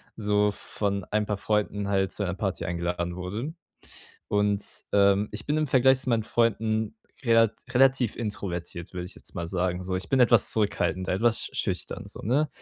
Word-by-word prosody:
so 105 -1 +2
von 100 -1 -3
ein 105 0 +1
paar 105 -1 -2
Freunden 105 -1 -1
halt 95 -2 +1
zu 105 - -3
einer 90 -2 -1
Party 95 -2 -2
eingeladen 85 0 -2
wurde. 105 - -4 0.8
Und, 105 0 +1 0.3
ähm, 100 0 +4
ich 105 +2 -4
bin 150 - +1
im 155 0 +1
Vergleich 130 0 +4
zu 135 - -4
meinen 115 -2 +2
Freunden 110 - 0 0.3
relat 115 -2 +4 0.2
relativ 130 -2 +3
introvertiert, 90 -6 -5
würde 90 -1 -4
ich 90 - -11
jetzt - - -13
mal 85 -3 -4
sagen, 90 0 -1
so. 95 0 -2
Ich 95 - -4
bin 135 - +2
etwas 120 -3 +5
zurückhaltend, 100 -3 0
e - - +1
etwas 115 +4 +1
schüchtern - - -2
so, - - -9
ne? 140 +8 +1
105 Hz, 180 wpm, -27 LUFS, 95-115 Hz, 0.8 s, etwas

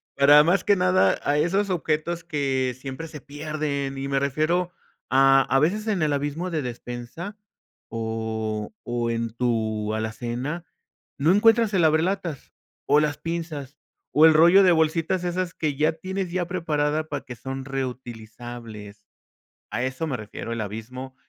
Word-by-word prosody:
para 145 +2 +7
más 180 +4 +3
que 205 -2 +3
nada 185 +1 +3
a 145 +1 +1
esos 195 +6 +1
objetos 165 0 -1
que 135 -6 -1
siempre 135 +4 -6
se 150 - -8
pierden 145 -1 -4
y 135 0 -3
me 135 0 +1
refiero 155 +6 0 0.4
a, 135 +1 +6
a 135 +1 +2
veces 210 +9 +1
en 200 -6 0
el 150 -2 +2
abismo 145 +6 -2
de 160 -3 -1
despensa 125 - -6 0.5
o 110 - -3
o 120 -1 -2
en 115 -1 -2
tu 110 -3 -1
alacena, 120 +9 -3 0.5
no 155 +5 +4
encuentras 225 +1 +4
el 180 - +3
abrelatas 160 0 0 0.3
o 150 - +5
las 150 -1 0
pinzas 160 -4 -5 0.4
o 150 +3 +7
el 160 - +8
rollo 175 +5 +7
de 180 - +6
bolsitas 165 +3 +1
esas 180 0 -2
que 150 -3 -2
ya 155 +3 +2
tienes 185 +2 -4
ya 180 -1 -1
preparada, 155 -4 0
para 145 -1 -4
que 125 -2 -8
son 135 +2 -6
reutilizables, 120 -5 -7 0.7
a 120 - -1
eso 130 +5 -2
me 135 -4 -2
refiero 110 +2 -7
el 115 - -3
abismo 125 +6 -7
145 Hz, 155 wpm, -24 LUFS, 125-170 Hz, 0.7 s, el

